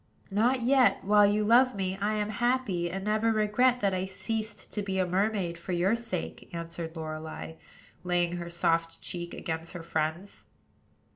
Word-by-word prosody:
"Not 235 +5 +2
yet: 260 +1 +4
while 205 +1 +6
you 210 +1 +2
love 245 +4 +5
me, 190 -1 -2
I 210 +1 +1
am 210 0 -1
happy, 215 -6 0
and 190 +2 -4
never 215 +2 +2
regret 225 +4 +2
that 200 -2 +2
I 185 0 -1
ceased 215 +2 -4
to 210 - -1
be 195 -1 -2
a 185 - +2
mermaid 185 -2 0
for 180 +2 -4
your 180 +5 +2
sake," 230 -7 -5
answered 170 -1 -6
Lorelei, 155 - -6 0.5
laying 175 -1 +1
her 170 0 -5
soft 165 -1 0
cheek 175 -1 -5
against 165 +1 -5
her 175 -2 -7
friend's. 165 +4 -3
190 Hz, 165 wpm, -29 LUFS, 170-215 Hz, 0.5 s, while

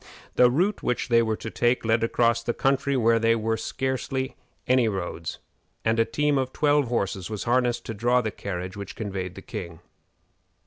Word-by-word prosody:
The 125 - +6
route 180 +11 +1
which 125 - -1
they 115 -1 +5
were 110 -1 0
to 110 - -6
take 120 0 +1
led 110 0 +2
across 115 0 +2
the 120 0 -2
country 135 0 +1
where 115 -1 +4
there 115 0 +3
were 110 0 0
scarcely 130 +2 -2 0.3
any 125 -2 +3
roads, 85 -5 -4 0.5
and 115 +1 +2
a 115 - +4
team 150 +1 +1
of 130 -1 -2
twelve 145 -2 +2
horses 100 -5 -2
was 105 -2 -4
harnessed 120 0 +1
to 115 - -4
draw 120 +4 +2
the 110 -3 -2
carriage 90 -2 -5
which 100 -1 -7
conveyed 95 -4 -4
the 95 - -10
king. 85 -2 -7
115 Hz, 185 wpm, -25 LUFS, 105-125 Hz, 0.5 s, The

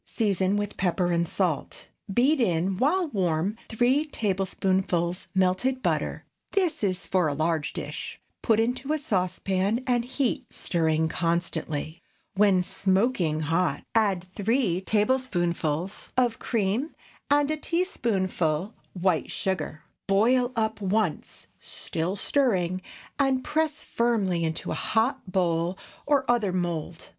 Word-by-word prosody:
Season 200 -3 +1
with 205 0 -3
pepper 180 -1 +1
and 170 0 +1
salt. 170 -5 -2 0.2
Beat 265 +9 +3
in, 185 -2 +1
while 325 - +2
warm, 185 - 0
three 245 +6 +3
tablespoonfuls 190 - -1
melted 190 +8 +1
butter - - -1 0.3
(this 350 - +1
is 185 -3 0
for 185 -3 +2
a 145 - -1
large 160 0 0
dish). - - -6 0.2
Put 225 -2 +3
into 250 +5 0
a - - +2
saucepan 195 -1 0
and 245 -2 +2
heat, 255 0 -2
stirring 160 -2 +1
constantly. 165 -1 -2 0.3
When 195 -2 +4
smoking 190 -5 +1
hot, 165 +4 0
add 200 -6 +2
three 195 0 0
tablespoonfuls 190 - 0
of 245 -3 +2
cream 225 +6 -1 0.3
and 290 +1 +3
a 310 - -1
teaspoonful 200 - -1 0.2
white 180 -3 +1
sugar. 165 -5 -3 0.2
Boil 245 +6 +3
up 220 -1 -1
once, 200 -3 -1
still 165 +4 -3
stirring, 185 -8 +1 0.4
and 265 -2 +2
press 310 0 -1
firmly 205 -8 +1
into 160 0 -2
a - - 0
hot 225 -2 0
bowl 175 -1 +1 0.3
or 285 -2 +3
other 235 -5 +2
mould. 175 -2 -3
195 Hz, 120 wpm, -26 LUFS, 175-245 Hz, 0.4 s, When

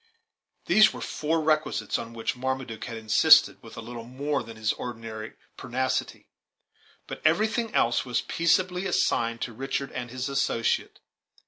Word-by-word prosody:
These 215 +4 +6
were - - -8
four 160 +2 -1
requisites, 155 -8 0
on 115 - -7
which 115 +2 -3
Marmaduke 130 -3 -4
had 115 -2 -6
insisted 110 -1 +5
with - - -13
a - - -5
little 115 0 -8
more 140 +5 -2
than 115 -1 -10
his 110 0 0
ordinary 110 -2 -7 0.2
pertinacity. 130 +1 -2 0.8
But - - -8
everything 215 +8 +2
else 120 +1 +2
was 125 -2 -1
peaceably 180 +2 +1
assigned 115 -9 0
to 120 - -4
Richard 135 +3 -3
and 120 -1 -5
his 130 +2 -4
associate. 135 -4 -1
130 Hz, 145 wpm, -26 LUFS, 115-155 Hz, 0.8 s, These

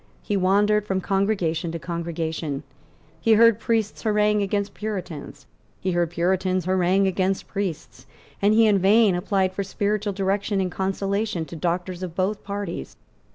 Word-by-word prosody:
He 205 - -1
wandered 205 +2 +2
from 190 -1 0
congregation 190 -4 0
to - - -2
congregation; 165 -3 -4 0.6
he 225 - +4
heard 230 0 +6
priests 225 -3 -1
harangue 210 -1 +2
against 200 0 -1
Puritans; 190 -8 -6 0.3
he 185 - -1
heard 175 -1 +1
Puritans 185 +1 0
harangue 185 +1 +2
against 190 0 0
priests; 195 -6 -5 0.3
and 205 +2 +4
he 225 0 +6
in 205 -2 +4
vain 205 +2 +5
applied 185 +1 0
for 200 - -2
spiritual 205 +1 -1
direction 200 +1 0
and 185 -1 -1
consolation 195 -1 -1
to 170 - -9
doctors 175 +2 -2
of 180 -3 -5
both 195 +3 -1
parties. 200 - -5
195 Hz, 150 wpm, -24 LUFS, 175-205 Hz, 0.6 s, heard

